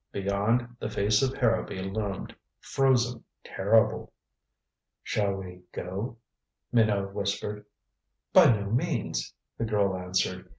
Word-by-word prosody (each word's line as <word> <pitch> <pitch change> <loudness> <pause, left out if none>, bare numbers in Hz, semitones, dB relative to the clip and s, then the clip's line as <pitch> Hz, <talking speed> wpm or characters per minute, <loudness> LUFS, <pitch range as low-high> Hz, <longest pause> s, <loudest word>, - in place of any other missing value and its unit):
Beyond, 105 +5 0
the 110 - -3
face 105 0 +2
of 135 0 0
Harrowby 115 -6 +1
loomed, 100 0 -4 0.2
frozen, 125 -3 +1 0.2
terrible. 110 +4 +2 0.9
"Shall 100 -2 0
we 90 -2 -8
go?" 100 +7 -5 0.5
Minot 105 -4 +2
whispered. 105 +1 -3 0.7
"By - - +8
no 100 -3 -1
means," 120 - -1 0.3
the 115 - 0
girl 100 -3 +1
answered. 90 0 -2
105 Hz, 110 wpm, -28 LUFS, 100-115 Hz, 0.9 s, By